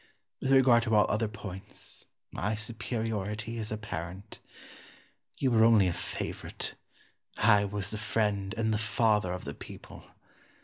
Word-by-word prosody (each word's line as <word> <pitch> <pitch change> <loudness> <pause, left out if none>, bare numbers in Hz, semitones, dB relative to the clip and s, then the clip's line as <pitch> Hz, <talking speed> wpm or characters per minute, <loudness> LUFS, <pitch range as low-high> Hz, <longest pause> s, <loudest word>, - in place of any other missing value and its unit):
With 135 - -1
regard 130 -3 +6
to 115 -1 +1
all 105 - +6
other 110 +1 +1
points, 100 -3 -7 0.3
my 105 +3 -1
superiority 110 0 -3
is 110 -1 -4
apparent. 100 -2 -6 1.0
You 130 -2 +1
were 110 -1 +5
only 110 -4 +6
a 90 - +1
favourite; - - -4 0.6
I 105 -2 +5
was 100 0 -4
the 110 - -4
friend 105 -1 0
and 110 -1 +1
the 105 - 0
father 110 -3 +2
of 90 0 -4
the - - -4
people. - - -11
110 Hz, 140 wpm, -30 LUFS, 100-115 Hz, 1.0 s, regard